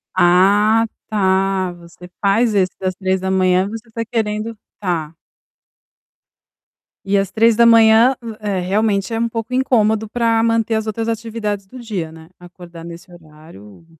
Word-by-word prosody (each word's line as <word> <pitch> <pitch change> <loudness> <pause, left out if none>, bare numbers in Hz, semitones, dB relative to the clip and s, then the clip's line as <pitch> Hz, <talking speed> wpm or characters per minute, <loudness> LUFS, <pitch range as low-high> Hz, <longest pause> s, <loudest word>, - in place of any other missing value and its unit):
Ah, 200 +5 +4 0.2
tá! 190 -2 0
Você 175 +1 -15
faz 210 +3 +2
esse 185 -2 +2
das 185 -1 -2
03:00, 190 -1 +1
você 225 +1 -9
tá 230 +1 -4
querendo 220 -1 -3 0.2
tá. 165 -5 -3 1.9
E 200 +1 +1
às 195 -1 -1
03:00, 230 +2 +5 0.2
eh, 205 -3 -2
realmente 200 +2 -1
é 225 - -1
um 235 0 0
pouco 230 +2 -5
incômodo, 220 -4 +1
pra 230 -1 +1
manter 230 -1 +1
as 220 0 -2
outras 225 +1 -3
atividades 220 -3 -4
do 255 +7 -12
dia, 195 -9 -5
né. 160 0 -15
Acordar 175 -1 -13
nesse 170 +2 -11
horário 155 - -16
205 Hz, 135 wpm, -18 LUFS, 185-225 Hz, 1.9 s, 03:00